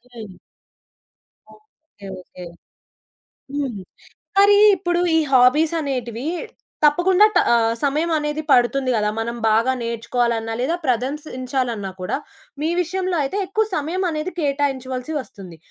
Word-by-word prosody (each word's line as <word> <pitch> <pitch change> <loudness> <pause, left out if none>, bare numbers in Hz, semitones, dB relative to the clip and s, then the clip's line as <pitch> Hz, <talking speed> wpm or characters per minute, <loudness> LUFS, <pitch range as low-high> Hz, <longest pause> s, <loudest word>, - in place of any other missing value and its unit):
హ్మ్. 215 -6 -10 1.2
Okay. 315 - -18
Okay. 180 0 -12 1.1
హ్మ్. 265 -9 -3 0.6
మరి 405 0 +6 0.2
ఇప్పుడు, 350 0 0 0.2
ఈ - - +5
హాబీసనేటివి 265 -2 +2 0.6
తప్పకుండా 355 +7 +5
ట - - +6 0.2
ఆహ్, 230 -1 +3
సమయమనేది 300 +1 0
పడుతుంది 255 +1 +3
గదా. 210 -1 +1
మనం 235 +1 -3
బాగా 230 +4 +3
నేర్చుకోవాలన్నా, 230 0 -1
లేదా 315 +7 0
ప్రదంసించాలన్నా 255 -4 -2
కూడా 180 - -2 0.4
మీ 315 - 0
విషయంలో 370 +1 -2
అయితే 330 +9 -3
ఎక్కువ 435 +4 0
సమయమనేది 330 +1 -2
కేటాయించవలసి 275 -2 -2
వస్తుంది. 190 -8 -11
270 Hz, 105 wpm, -21 LUFS, 235-320 Hz, 1.2 s, మరి